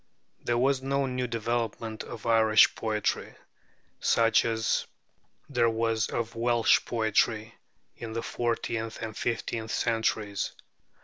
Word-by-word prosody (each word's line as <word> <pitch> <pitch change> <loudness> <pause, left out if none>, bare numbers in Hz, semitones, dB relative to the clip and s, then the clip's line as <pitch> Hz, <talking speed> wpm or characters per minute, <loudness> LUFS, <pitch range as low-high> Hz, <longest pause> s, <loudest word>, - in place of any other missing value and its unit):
There 120 0 0
was 130 +2 +2
no 140 +1 0
new 125 -1 -2
development 115 -1 -3
of 115 -3 -9
Irish 110 -1 +5
poetry, 110 -2 -2 0.6
such 115 -1 +3
as 115 -1 0 0.6
there 115 - +2
was 115 -1 0
of 115 -1 -3
Welsh 120 0 +3
poetry 110 0 +1 0.4
in 115 -1 -6
the 115 - -3
fourteenth 115 -1 -2
and 110 -1 -5
fifteenth 115 -1 -3
centuries. 110 -3 -1
115 Hz, 115 wpm, -28 LUFS, 110-120 Hz, 0.6 s, Irish